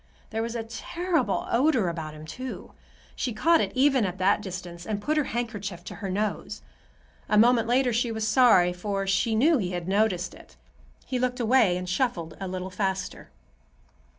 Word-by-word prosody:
There 225 0 -1
was 230 +1 -3
a 230 - -2
terrible 335 +10 -1
odor 250 - +3
about 160 -2 -4
him, 155 0 -10
too. 255 +11 -7 0.4
She 245 - -2
caught 325 +10 +3
it - - -1
even 265 -2 +4
at 185 -2 -2
that 200 +2 +2
distance, 180 -3 -7
and 210 -2 -2
put 300 +9 -1
her 300 -2 +2
handkerchief 205 -6 -4
to - - -8
her 195 - -3
nose. 210 +3 -3 0.7
A 210 - +3
moment 230 +1 +5
later 250 0 +2
she 235 +1 0
was 220 -1 -2
sorry, 215 -7 +5
for 195 +2 -3
she 205 +3 +1
knew 300 +8 +4
that - - -1
he 180 -1 -2
had 175 -1 -4
noticed 195 -2 +1
it. - - -16 0.5
He 255 - -2
looked 250 0 -1
away 230 -6 +3
and 180 0 -5
shuffled 180 -6 -1
a 195 - -4
little 185 0 -5
faster. 190 0 -3
215 Hz, 185 wpm, -26 LUFS, 185-245 Hz, 0.7 s, moment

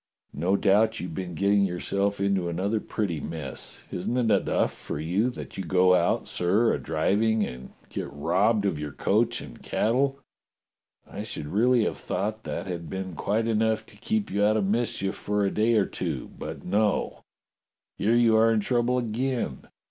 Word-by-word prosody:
No 90 +7 +1
doubt 110 +3 +3
you've 90 -2 -5
been 90 0 -5
getting 100 +2 +3
yourself 100 +2 -1
into 100 -3 +1
another 100 +6 0
pretty 100 -7 -2
mess. 75 -4 -6
Isn't 105 +8 -2
it 115 -3 +2
enough - - +2
for - - -6
you 90 +10 +1
that 120 - -8
you - - -2
go 90 +1 +4
out, 85 -1 +2
sir, 100 +7 +2
a - - -1
driving 105 +8 +1
256 65 -9 -4 0.2
DOCTOR - - -23
SYN - - -2
and - - -6
get 70 +1 -9
robbed 100 +5 +3
of 90 -7 0
your 75 -2 -5
coach 115 +10 +1
and 65 -4 -11
cattle? 135 +5 +1 0.9
I - - -7
should - - -5
really 115 +9 +3
have - - -1
thought 110 +2 -3
that - - -4
had 85 -4 -5
been 95 0 -4
quite 105 +7 0
enough 110 0 +1
to - - -17
keep 220 -1 -2
you 100 +1 +1
out 105 +1 +4
of 105 - +1
mischief 105 -2 0
for 105 0 -1
a 100 - +1
day 115 +2 +2
or 105 -3 +4
two. - - -4
But - - -7
no! 105 +2 0 0.8
Here 110 +4 +3
you 115 -2 +5
are 115 +1 +5
in 110 - +3
trouble 120 +3 +1
again. 120 - -2
100 Hz, 185 wpm, -26 LUFS, 90-110 Hz, 0.9 s, you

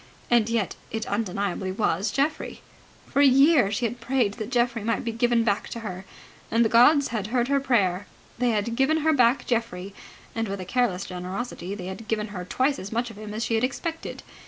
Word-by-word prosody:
And 235 -2 +4
yet 230 -4 -1
it 220 0 -3
undeniably 195 -2 -2
was 205 +1 0
Geoffrey. 285 +7 -2 0.4
For 280 - +1
a 285 - +7
year 275 -4 +5
she 225 +4 -1
had 240 +2 -3
prayed 245 -5 +1
that 215 0 -6
Geoffrey 240 -3 +1
might 230 +1 0
be 230 - -2
given 235 0 +2
back 205 -3 0
to 230 - -6
her, 190 -3 -6 0.4
and 230 +1 +3
the - - +2
gods 270 +5 +5
had 215 -4 -3
heard 240 +2 0
her 280 0 +3
prayer. 205 -8 +1 0.3
They 245 0 +2
had 225 +1 0
given 305 +5 +2
her 315 - +5
back 250 -1 +3
Geoffrey, 200 -5 -2 0.4
and 225 -1 -2
with 200 0 -4
a 185 - -5
careless 200 -3 0
generosity 185 +1 -5
they 185 -3 -7
had 190 +4 -7
given 215 -1 -1
her 185 -3 -6
twice 265 +9 0
as 195 - -7
much 235 +1 -1
of 215 - -14
him 215 -1 -7
as 220 +2 -2
she - - -2
had 225 +1 +1
expected. 325 +5 -3
230 Hz, 210 wpm, -25 LUFS, 200-250 Hz, 0.4 s, a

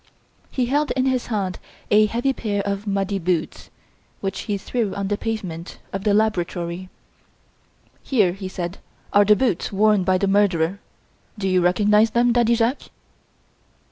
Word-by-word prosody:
He 255 - -1
held 290 +4 +1
in 260 0 0
his 260 -2 0
hand 195 -5 -2 0.3
a 215 +1 +6
heavy 240 +5 0
pair 205 -5 -2
of 200 +1 -3
muddy 195 0 -1
boots, 170 -2 -2 0.5
which 195 -1 -3
he 205 - +1
threw 215 0 -2
on 200 -1 -3
the 205 - +1
pavement 195 -7 -5 0.2
of 195 +2 -4
the 205 - +3
laboratory. 180 -4 -1 1.1
"Here," 210 -9 +2
he 195 0 -6
said, 180 0 -5 0.3
"are 205 0 +6
the 210 +1 +6
boots 225 -7 0
worn 210 -1 +3
by 185 0 +2
the 200 - 0
murderer. 195 -2 +2 0.6
Do 195 -2 -2
you 185 -1 +3
recognise 210 +5 +4
them, 240 +2 +2
Daddy 235 -1 +3
Jacques?" 235 +4 -1
205 Hz, 155 wpm, -22 LUFS, 185-225 Hz, 1.1 s, a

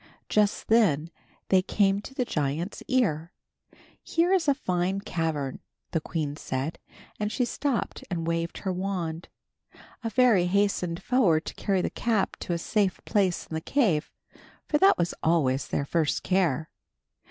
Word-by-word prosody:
Just 210 -1 +1
then 170 -9 +3 0.4
they 190 -1 +5
came 195 +1 +2
to 265 - -11
the 250 - 0
giant's 155 +2 -2
ear. 175 -11 +1 0.7
"Here 345 +3 +1
is 360 -4 +2
a 280 - +4
fine 185 -4 -1
cavern," 160 -8 -2 0.3
the 165 - 0
queen 150 -3 -3
said, 135 +2 -3 0.4
and 210 0 -1
she 250 - +1
stopped 265 -1 -2
and 170 -3 -2
waved 165 0 -2
her 190 -2 -2
wand. 180 -3 -3 0.7
A 225 - -1
fairy 225 -7 +4
hastened 185 -3 0
forward 195 -11 +3
to - - -5
carry 190 -3 0
the - - -1
cap 220 -5 0
to 175 - -3
a - - 0
safe 195 +2 0
place 195 -5 +1
in - - -10
the 160 - -2
cave, 185 - +1 0.6
for 295 - +1
that 390 +1 +6
was 175 0 0
always 145 -5 +2
their 140 - -1
first 160 0 0
care. 165 -6 +1
180 Hz, 155 wpm, -27 LUFS, 160-210 Hz, 0.7 s, that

